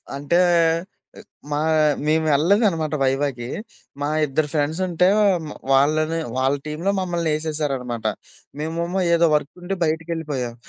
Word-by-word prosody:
అంటే 145 Hz, +6 st, +1 dB, 1.1 s
మా 145 Hz, -, 0 dB, 0.5 s
మేమెళ్ళలేదనమాట 160 Hz, +2 st, +2 dB
వైవాకి. 135 Hz, -2 st, -1 dB, 0.5 s
మా 145 Hz, -, 0 dB, 0.2 s
ఇద్దరు 150 Hz, +2 st, -1 dB
ఫ్రెండ్సుంటే 170 Hz, +4 st, +1 dB, 0.4 s
మ -, -, -7 dB, 0.2 s
వాళ్ళని, 155 Hz, +4 st, +2 dB, 0.2 s
వాళ్ళ 135 Hz, +2 st, +2 dB
టీమ్‌లో 155 Hz, +6 st, -1 dB
మమ్మల్ని 170 Hz, -3 st, -1 dB
ఏసేశారనమాట. 140 Hz, -7 st, -3 dB, 0.5 s
మేమేమో 170 Hz, +4 st, -2 dB
ఏదో 170 Hz, 0 st, +4 dB
వర్కుండి 175 Hz, +6 st, -2 dB
బయటికెళ్ళిపోయాం. 155 Hz, -6 st, -3 dB
155 Hz, 95 wpm, -22 LUFS, 145-170 Hz, 1.1 s, ఏదో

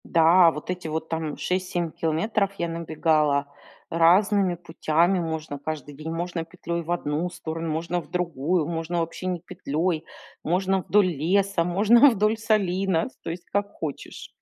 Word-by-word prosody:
Да, 170 Hz, +2 st, +6 dB
вот 150 Hz, +1 st, -8 dB
эти 180 Hz, -2 st, -5 dB
вот 160 Hz, +1 st, -4 dB
там 160 Hz, -2 st, -3 dB
6-7 180 Hz, -2 st, -2 dB
километров 190 Hz, +7 st, 0 dB
я 170 Hz, -, -1 dB
набегала 155 Hz, -3 st, +1 dB, 0.5 s
разными 185 Hz, +3 st, +4 dB
путями. 170 Hz, +1 st, +1 dB
Можно 160 Hz, -3 st, -4 dB
каждый 145 Hz, -1 st, -5 dB
день, 155 Hz, +3 st, -7 dB
можно 170 Hz, 0 st, -3 dB
петлей 170 Hz, 0 st, -5 dB
в 170 Hz, +1 st, -6 dB
одну 165 Hz, 0 st, -1 dB
сторону, 165 Hz, -1 st, -5 dB
можно 170 Hz, +3 st, -2 dB
в -, -, -18 dB
другую, 170 Hz, -2 st, 0 dB
можно 170 Hz, +1 st, -2 dB
вообще 165 Hz, +2 st, -4 dB
не 180 Hz, -1 st, -1 dB
петлей, 165 Hz, -1 st, -2 dB, 0.4 s
можно 190 Hz, +3 st, +1 dB
вдоль 205 Hz, +1 st, +3 dB
леса, 185 Hz, +3 st, +1 dB
можно 215 Hz, +10 st, +6 dB
вдоль 215 Hz, -1 st, +1 dB
солина, 195 Hz, -4 st, +1 dB
с -, -, -28 dB
то -, -, -7 dB
есть 170 Hz, +1 st, -6 dB
как 200 Hz, 0 st, 0 dB
хочешь. 150 Hz, -4 st, -6 dB
170 Hz, 155 wpm, -25 LUFS, 160-185 Hz, 0.5 s, Да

